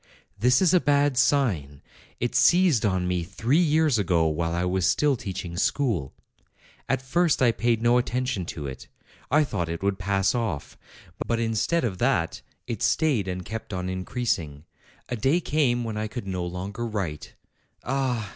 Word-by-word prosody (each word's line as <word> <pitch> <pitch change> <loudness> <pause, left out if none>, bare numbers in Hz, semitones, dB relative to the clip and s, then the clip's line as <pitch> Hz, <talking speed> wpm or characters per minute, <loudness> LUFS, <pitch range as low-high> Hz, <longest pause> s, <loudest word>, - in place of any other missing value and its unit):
'This 125 - +4
is 180 -1 +4
a 180 - +6
bad 145 -1 +2
sign. 100 - +1 0.4
It 120 - -1
seized 175 - +4
on 95 -2 0
me 90 -1 0
three 110 - 0
years 155 -6 +3
ago, 85 -4 +2
while 80 +1 0
I 85 +1 -1
was 90 0 +1
still 145 -2 +2
teaching 95 -6 -6
school. 100 - 0 0.8
At 130 - 0
first 170 +4 +2
I 125 -3 +4
paid 115 +1 0
no 120 +1 +4
attention 125 -6 -2
to 75 - -6
it; 65 -2 -7 0.4
I 150 +2 +4
thought 95 - -3
it 85 +2 -5
would 100 -1 0
pass 95 0 +1
off. 115 -12 -3 0.5
But 115 -1 0
instead 115 +9 0
of 95 -7 -2
that, 120 -10 0 0.2
it - - -5
stayed 135 - +2
and 90 -1 -4
kept 110 0 -6
on 90 0 -3
increasing. 90 - -3 0.4
A 125 - -3
day 135 +9 +2
came 140 -7 +1
when 110 -2 -4
I 110 0 -2
could 105 +1 -6
no 95 -2 -3
longer 95 +6 -5
write. 95 -9 -4 0.5
Ah! 125 -5 -1
110 Hz, 170 wpm, -25 LUFS, 90-130 Hz, 0.8 s, a